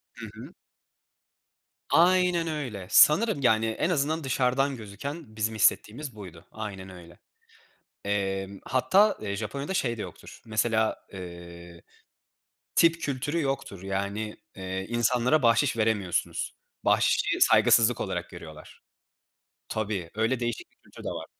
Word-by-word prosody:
Hı - - -8
hı. - - -11 1.4
Aynen 180 -1 +4
öyle. 125 - -4
Sanırım, 205 +3 +5
yani, 115 -3 +3
en 110 +9 -1
azından 160 -1 0
dışarıdan 135 +1 +1
gözüken 110 +4 -8
bizim 110 0 -1
hissettiğimiz 115 +4 +1
buydu, 90 -6 -11
aynen 100 -3 -7
öyle. 90 -2 -13 0.9
Emm, 95 -1 -2
hatta, 185 - +3
eee, 100 -2 -3
Japonya'da 140 - -4
şey 120 -9 0
de - - -4
yoktur, - - -10
mesela, 110 0 0
eee, 85 -2 -10 0.9
tip 165 0 +4
kültürü 145 +4 -2
yoktur, 135 - -3
yani, 100 +2 -3 0.2
eee, 95 0 -4
insanlara 120 +5 +2
bahşiş 115 +1 +3
veremiyorsunuz. 105 -5 -1 0.3
Bahşişi - - +2
saygısızlık 115 +1 +5
olarak 90 -3 -3
görüyorlar. 80 -3 -12 0.9
Tabii, 100 -6 -3
öyle 115 +3 +1
değişik 120 -2 -4
bir - - -36
kültür - - -14
de - - -3
var. - - -5
110 Hz, 120 wpm, -27 LUFS, 95-135 Hz, 1.4 s, Sanırım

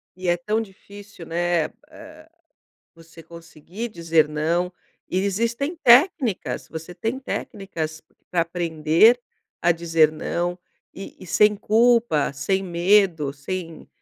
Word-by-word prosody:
E 185 0 -6
é 175 - +2
tão 210 +6 -1
difícil, 200 -2 -12
né, 170 0 0 0.2
ah, 315 +1 -14 0.7
você 165 0 -15
conseguir 170 +6 -9
dizer 165 -6 +1
não, 165 +4 -1 0.4
e 185 - -1
existem 230 - -1
técnicas, 260 - +3
você 165 +2 -8
tem 225 +7 -3
técnicas 170 - -5 0.3
pra 175 -2 +2
aprender 170 +6 +3 0.4
a 175 - +4
dizer 165 -2 +2
não 175 +3 -3 0.3
e 195 - -10
e - - -12
sem 210 +4 +3
culpa, 225 - +2
sem 190 +8 -1
medo, 175 -4 +2
sem, 165 +3 -7
175 Hz, 120 wpm, -23 LUFS, 165-210 Hz, 0.7 s, a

